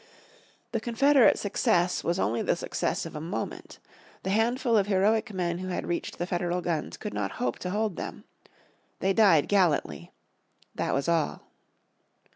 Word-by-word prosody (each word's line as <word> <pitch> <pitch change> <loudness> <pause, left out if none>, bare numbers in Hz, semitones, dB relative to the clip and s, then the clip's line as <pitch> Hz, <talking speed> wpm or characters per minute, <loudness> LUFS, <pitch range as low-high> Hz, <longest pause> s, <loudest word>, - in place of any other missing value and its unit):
The 230 - -1
Confederate 250 +3 +4
success 180 -3 +1
was 170 +1 0
only 115 - 0
the - - +1
success - - -2
of - - -8
a 150 - -5
moment. 170 +6 -5 0.5
The 190 - -1
handful 235 +3 +2
of 205 -2 +3
heroic 215 +3 +2
men 175 -3 -2
who 185 - -5
had 180 - -3
reached 175 - -3
the 175 - -2
Federal 175 -1 -1
guns 170 -3 -3
could 210 - -6
not - - -2
hope 250 - -2
to 180 - -4
hold 210 0 -1
them. - - -6 0.8
They 195 +1 +1
died 190 -8 +5
gallantly. 185 -7 +1 0.6
That - - -1
was 140 +3 -1
all. 165 -3 0
190 Hz, 160 wpm, -27 LUFS, 175-220 Hz, 0.8 s, died